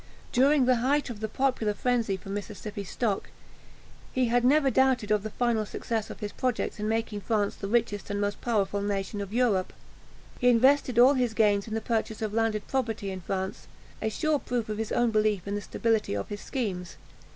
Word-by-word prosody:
During 275 +1 +4
the 250 -1 +4
height 275 +3 +1
of 220 - -8
the 220 - -2
popular 225 -3 0
frenzy 230 -3 0
for 190 - -12
Mississippi 205 +1 -5
stock, 200 +1 -2 0.8
he 255 -2 +1
had 240 +1 +2
never 275 +1 +4
doubted 255 -5 +2
of 210 -1 +3
the 215 - -5
final 235 -1 0
success 220 +1 -3
of - - -9
his 205 -1 -3
projects 255 -3 -2
in 210 - -2
making 225 -1 -1
France 205 0 0
the 195 - -5
richest 210 -2 0
and 205 0 -2
most 205 0 -2
powerful 205 -4 0
nation 200 0 -2
of 200 -1 -6
Europe. 220 -6 +1 0.7
He 245 - +4
invested 255 +1 +4
all 255 +4 +8
his 245 -4 0
gains 205 -2 +3
in 220 - -4
the 225 - -1
purchase 220 -1 -2
of 215 -1 -2
landed 220 -2 0
property 225 -7 -2
in 190 -1 -6
France 190 +1 -4 0.3
a 220 - 0
sure 310 +6 0
proof 240 -4 -3
of 215 0 -3
his 220 - -3
own 240 -1 +2
belief 215 -3 +1
in 200 - -2
the 205 - -2
stability 220 - 0
of 100 - -4
his 205 - -5
schemes. 190 -9 -4
220 Hz, 200 wpm, -28 LUFS, 205-245 Hz, 0.8 s, all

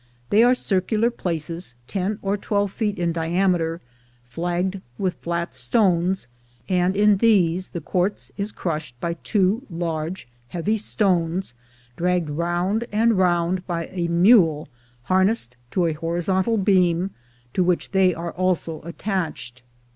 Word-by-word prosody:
They 210 - +6
are 245 +2 +5
circular 215 +2 +1
places, 165 - -3
ten 200 - -2
or 195 +1 +1
twelve 205 -1 -1
feet 210 -3 -1
in 170 -1 0
diameter, 170 0 0 0.5
flagged 175 +6 -2 0.2
with 185 -2 0
flat 170 -1 -3
stones, 175 - +1 0.4
and 185 0 +1
in 205 0 +4
these 185 -5 +3
the 170 - -6
quartz 180 +6 -1
is 205 +1 -2
crushed 155 -10 -4
by 170 +4 -1
two 195 +5 +1
large 165 -1 -3 0.2
heavy 180 - -1
stones 185 - 0 0.4
dragged 175 -3 0
round 175 +8 0
and 225 +2 +3
round 180 0 +1
by 170 -2 -3
a 175 -2 -1
mule 170 -3 +4 0.4
harnessed 190 - +1
to 180 +5 +1
a 165 - +1
horizontal 175 +7 0
beam, 185 -2 +2 0.4
to 185 - +2
which 180 -1 0
they 190 -1 +4
are 170 0 -4
also 180 -3 -1
attached. 170 - -4
180 Hz, 130 wpm, -23 LUFS, 170-195 Hz, 0.5 s, They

